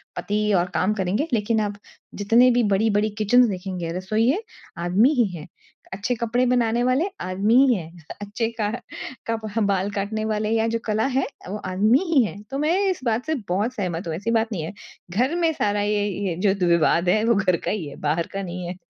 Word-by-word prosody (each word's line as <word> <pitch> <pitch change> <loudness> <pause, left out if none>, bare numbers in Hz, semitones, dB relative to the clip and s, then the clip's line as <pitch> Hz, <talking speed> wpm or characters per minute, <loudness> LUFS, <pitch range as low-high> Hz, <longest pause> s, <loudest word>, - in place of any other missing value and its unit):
पति 210 +1 -1
और 175 - +2
काम 190 +5 +1
करेंगे 200 - -1
लेकिन 220 0 +1
आप 205 -1 -1 0.4
जितने 230 +5 +4
भी 245 0 +2
बड़ी-बड़ी 210 +1 +2
किचन्स 240 +3 +4
देखेंगे, 180 -3 -4
रसोइए 225 - +1 0.4
आदमी 185 +9 +3
ही 245 -6 +3
हैं। 150 - -10 0.5
अच्छे 205 +6 -2
कपड़े 235 +2 0
बनाने 240 -1 +2
वाले 255 +7 +2 0.2
आदमी 195 +5 +1
ही 250 - +4
हैं, 165 -4 -6 0.3
अच्छे 215 +3 -2
क 215 +3 -1 0.5
कप 225 -1 -2 0.2
बाल 195 0 0
काटने 210 +2 -2
वाले 215 0 -1
या 225 0 +1
जो 230 0 -1
कला 215 +1 +1
है 270 - +2 0.2
वो 210 - -3
आदमी 210 +8 +3
ही 265 -6 +6
है, 205 0 -5
तो 275 - -2
मैं 310 +5 +1
इस 370 - -2
बात 230 +2 0
से 315 0 0
बहुत 210 +7 0
सहमत 180 -5 -3
हूँ, 160 - -2
ऐसी 205 +7 -2
बात 225 0 +2
नहीं 170 -6 -3
है। 165 - -6 0.4
घर 255 - +1
में 335 -2 +2
सारा 205 -7 0
ये 205 0 0 0.2
ये 170 - -2
जो 190 - +4
द 175 - +2
विवाद 170 +1 +3
है 215 +3 +3
वो 230 -1 +3
घर 185 -4 +2
का - - 0
ही 185 -8 -3
है, 140 - -10
बाहर 155 +3 0
का 195 - -2
नहीं 180 0 -5
है। 180 - -5
210 Hz, 210 wpm, -23 LUFS, 190-235 Hz, 0.5 s, ही